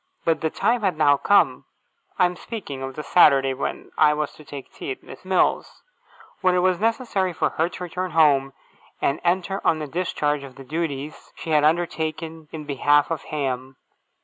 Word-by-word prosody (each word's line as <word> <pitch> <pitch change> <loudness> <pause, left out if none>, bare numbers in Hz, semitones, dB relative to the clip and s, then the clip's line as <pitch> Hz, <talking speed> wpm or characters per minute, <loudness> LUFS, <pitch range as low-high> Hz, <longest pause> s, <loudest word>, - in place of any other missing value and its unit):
But 165 -1 +1
the 160 - +1
time 235 +8 +1
had 190 -6 0
now 145 -2 +5
come 200 +7 +3 0.5
(I - - +5
am 180 0 -1
speaking 175 - -7
of 135 0 -5
the 150 - -5
Saturday 135 -6 +5
when 130 - -5
I 150 0 +5
was 150 -1 -3
to 155 - -15
take 140 -2 -10
tea - - -7
at 130 - -5
Miss - - -12
Mills's) 185 -1 0 0.6
when 185 -1 +2
it 180 - +2
was 185 -2 +2
necessary 225 -4 0
for - - 0
her 165 +2 0
to 180 - -8
return 180 +1 -4
home, 145 -5 +3 0.5
and 140 - 0
enter 185 +2 0
on 160 - +3
the 155 - -4
discharge 150 -2 -1
of 135 -2 -11
the 135 - -11
duties 150 0 -5
she 160 - -6
had 150 -1 +4
undertaken 160 -1 -1
in 155 -2 -7
behalf 145 +2 +2
of 165 - -3
Ham. 130 -3 -3
155 Hz, 190 wpm, -23 LUFS, 145-180 Hz, 0.6 s, now